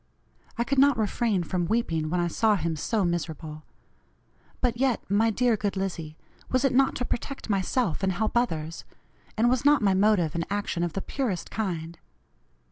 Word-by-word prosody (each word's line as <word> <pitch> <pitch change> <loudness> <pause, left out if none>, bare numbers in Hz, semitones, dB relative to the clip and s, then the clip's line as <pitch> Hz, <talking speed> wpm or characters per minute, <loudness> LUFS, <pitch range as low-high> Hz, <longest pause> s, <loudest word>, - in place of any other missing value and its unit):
I 235 - +2
could 275 +2 0
not 280 -2 +5
refrain 215 -3 0
from 175 0 -1
weeping 165 -8 0
when 180 +2 0
I 175 - +1
saw 215 +5 +2
him 165 -3 -1
so 200 +6 0
miserable. 160 -3 -3 1.0
But 245 -2 +1
yet, 260 -2 +2
my 220 +3 +4
dear 240 +1 +2
good 205 -2 -2
Lizzie, 170 -5 -4 0.3
was 255 +1 +2
it 270 - +2
not 270 +1 +3
to 250 - -2
protect 255 -1 -4
myself 195 0 0
and 190 -1 +1
help 220 +6 -1
others 165 -9 -1 0.5
and 230 +2 +3
was 250 +1 +2
not 290 -4 +4
my 195 -2 +4
motive 190 -5 +3
and 170 - -1
action 200 -3 -2
of 170 -2 -1
the 195 - -3
purest 225 -11 -3
kind? 170 -6 -3
200 Hz, 180 wpm, -27 LUFS, 170-240 Hz, 1.0 s, not